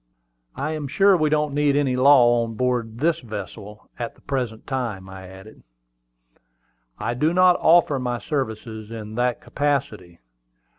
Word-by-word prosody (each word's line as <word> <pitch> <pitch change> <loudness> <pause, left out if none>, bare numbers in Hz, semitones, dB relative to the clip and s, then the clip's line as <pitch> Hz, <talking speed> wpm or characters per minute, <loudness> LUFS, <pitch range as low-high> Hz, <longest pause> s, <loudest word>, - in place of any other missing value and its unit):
"I 155 - -3
am 155 -2 -4
sure 195 +7 +4
we 155 -3 +1
don't 150 -1 0
need 145 -1 +2
any 140 -3 +1
law 125 -3 +5
on 115 -1 -6
board 125 -1 0
of 110 0 -14
this 165 +1 +2
vessel 105 - -9
at 120 -1 -5
the - - -24
present 125 -5 -4
time," 115 -8 -4
I 95 0 -10
added. 95 +3 -14 1.4
"I - - -2
do 155 +7 0
not 185 -1 +5
offer 160 -4 +4
my 125 -1 -2
services 110 -5 -4
in 110 -2 -8
that 120 +1 -1
capacity. 130 -12 -2
125 Hz, 155 wpm, -23 LUFS, 110-145 Hz, 1.4 s, law